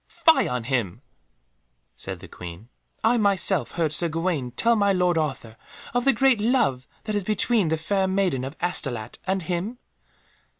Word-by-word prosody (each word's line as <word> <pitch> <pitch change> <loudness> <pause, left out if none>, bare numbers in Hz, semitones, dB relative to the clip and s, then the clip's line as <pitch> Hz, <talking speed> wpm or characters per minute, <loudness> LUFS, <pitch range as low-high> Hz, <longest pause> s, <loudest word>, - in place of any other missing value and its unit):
"Fie 320 -1 +3
on 125 -1 -2
him!" 120 -7 -2 1.0
said - - -6
the - - -10
Queen, 90 +6 -10 0.3
"I 230 +2 +3
myself 200 -4 +2
heard 160 -3 0
Sir 170 +3 +3
Gawaine 165 -5 -2
tell 230 - +2
my 200 -2 +3
lord 180 -2 +2
Arthur 135 -8 -3 0.4
of 245 0 0
the 275 - +6
great 255 0 +3
love 210 - +1 0.2
that 215 - -4
is 205 -1 0
between 215 0 +1
the 160 +1 0
Fair 190 +4 0
Maiden 190 -9 0
of 135 +4 -7
Astolat 130 -10 -2
and 190 -1 0
him." 180 +8 -3
175 Hz, 165 wpm, -24 LUFS, 135-205 Hz, 1.0 s, the